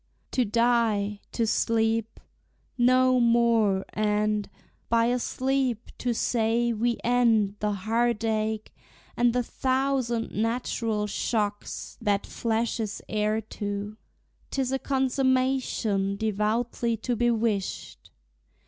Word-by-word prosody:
To 255 Hz, -, +2 dB
die, 225 Hz, -3 st, +1 dB
to 230 Hz, -, 0 dB
sleep; 225 Hz, 0 st, 0 dB, 0.6 s
No 255 Hz, +1 st, +4 dB
more; 230 Hz, -4 st, +3 dB
and, 210 Hz, -1 st, 0 dB, 0.4 s
by 230 Hz, 0 st, +3 dB
a 245 Hz, +1 st, +1 dB
sleep, 260 Hz, -2 st, -1 dB
to 245 Hz, -, 0 dB
say 235 Hz, 0 st, +1 dB
we 235 Hz, +1 st, 0 dB
end 230 Hz, -4 st, +3 dB
The 210 Hz, 0 st, 0 dB
heart 225 Hz, +3 st, 0 dB
ache, 220 Hz, -1 st, -1 dB, 0.4 s
and 240 Hz, 0 st, +3 dB
the 250 Hz, +1 st, 0 dB
thousand 260 Hz, -2 st, -1 dB
natural 225 Hz, -1 st, -1 dB
shocks 210 Hz, 0 st, -3 dB
That 205 Hz, -3 st, +1 dB
flesh 230 Hz, +1 st, -1 dB
is 215 Hz, -2 st, -4 dB
heir 215 Hz, +1 st, 0 dB
to, 205 Hz, 0 st, -5 dB, 0.5 s
't -, -, -4 dB
is 255 Hz, -, -3 dB
a 270 Hz, -, 0 dB
consummation 260 Hz, -7 st, +1 dB
Devoutly 220 Hz, +2 st, 0 dB
to 240 Hz, +3 st, -2 dB
be 240 Hz, +1 st, +2 dB
wished. 220 Hz, -4 st, -2 dB
230 Hz, 110 wpm, -26 LUFS, 210-245 Hz, 0.6 s, No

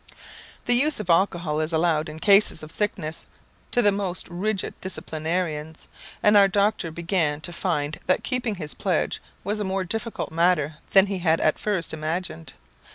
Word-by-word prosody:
The 245 Hz, -, +4 dB
use 285 Hz, +3 st, +3 dB
of 185 Hz, -5 st, 0 dB
alcohol 170 Hz, -3 st, +1 dB
is 155 Hz, +1 st, -1 dB
allowed 160 Hz, -1 st, +1 dB
in 155 Hz, -, -8 dB
cases 200 Hz, -4 st, +4 dB
of 155 Hz, -, -8 dB
sickness 170 Hz, -6 st, -3 dB, 0.4 s
to 245 Hz, -, +2 dB
the 205 Hz, -, +5 dB
most 195 Hz, -3 st, -2 dB
rigid 190 Hz, +3 st, -2 dB
disciplinarians, 160 Hz, -3 st, -3 dB, 0.4 s
and 210 Hz, 0 st, +5 dB
our 200 Hz, -1 st, +7 dB
doctor 200 Hz, -3 st, +1 dB
began 165 Hz, -2 st, 0 dB
to 175 Hz, -, -5 dB
find 160 Hz, -5 st, -2 dB
that 185 Hz, -, +2 dB
keeping 245 Hz, -4 st, -1 dB
his 155 Hz, -5 st, -5 dB
pledge 180 Hz, -5 st, -1 dB, 0.2 s
was 210 Hz, +3 st, -2 dB
a -, -, -1 dB
more 190 Hz, -1 st, -1 dB
difficult 225 Hz, +5 st, -3 dB
matter 160 Hz, -3 st, +1 dB
than 195 Hz, 0 st, +7 dB
he 195 Hz, -2 st, -3 dB
had 165 Hz, -2 st, +2 dB
at 155 Hz, -, +1 dB
first 195 Hz, -7 st, -2 dB
imagined. 160 Hz, -, -4 dB
180 Hz, 165 wpm, -24 LUFS, 160-200 Hz, 0.4 s, our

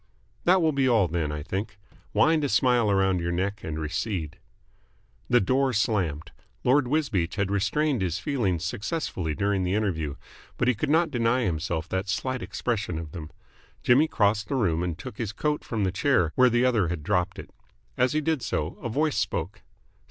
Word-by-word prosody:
"That 180 Hz, 0 st, +5 dB
will 160 Hz, -, +3 dB
be 135 Hz, -2 st, +2 dB
all 110 Hz, -6 st, +4 dB
then, 80 Hz, -2 st, -2 dB
I 75 Hz, -1 st, -4 dB
think. 100 Hz, +5 st, -4 dB, 0.3 s
Wind 150 Hz, +9 st, +3 dB
a 145 Hz, -, 0 dB
smile 125 Hz, -5 st, +3 dB
around 95 Hz, -2 st, +2 dB
your 85 Hz, 0 st, -2 dB
neck 100 Hz, +4 st, -2 dB
and 80 Hz, -1 st, -4 dB
recede." 85 Hz, +1 st, -3 dB, 0.9 s
The 120 Hz, -, +5 dB
door 130 Hz, +6 st, +1 dB
slammed. 95 Hz, -, 0 dB, 0.3 s
Lord 130 Hz, +1 st, +3 dB
Wisbeach 120 Hz, -, 0 dB
had 100 Hz, -1 st, -1 dB
restrained 115 Hz, +7 st, +1 dB
his 90 Hz, -2 st, -1 dB
feelings 95 Hz, -, -1 dB
successfully 100 Hz, -, -3 dB
during 100 Hz, -1 st, 0 dB
the 90 Hz, +2 st, 0 dB
interview, 80 Hz, -9 st, -1 dB, 0.4 s
but 125 Hz, -, +1 dB
he 125 Hz, -, +4 dB
could 110 Hz, -, -3 dB
not 160 Hz, +1 st, +3 dB
deny 120 Hz, 0 st, +1 dB
himself 80 Hz, -3 st, -2 dB
that 95 Hz, +1 st, -2 dB
slight 130 Hz, +5 st, -2 dB
expression 100 Hz, -11 st, -2 dB
of 80 Hz, -2 st, -6 dB
them. 80 Hz, -2 st, -7 dB, 0.5 s
Jimmy 140 Hz, +6 st, +5 dB
crossed 105 Hz, -5 st, +1 dB
the -, -, -2 dB
room 90 Hz, -10 st, +1 dB
and 90 Hz, -2 st, -2 dB
took 100 Hz, -, -9 dB
his 110 Hz, -3 st, -3 dB
coat 150 Hz, +5 st, -1 dB
from 110 Hz, -3 st, -2 dB
the 95 Hz, -, +1 dB
chair 95 Hz, -, +2 dB
where 125 Hz, 0 st, +5 dB
the 120 Hz, +1 st, +2 dB
other 115 Hz, -8 st, +2 dB
had 85 Hz, -3 st, -4 dB
dropped 90 Hz, +1 st, 0 dB
it. -, -, -9 dB, 0.4 s
As 125 Hz, -, +2 dB
he 155 Hz, -, +1 dB
did 155 Hz, -2 st, 0 dB
so 80 Hz, -7 st, -3 dB
a 120 Hz, -, -3 dB
voice 150 Hz, +5 st, 0 dB
spoke. -, -, -2 dB
105 Hz, 190 wpm, -26 LUFS, 90-130 Hz, 0.9 s, That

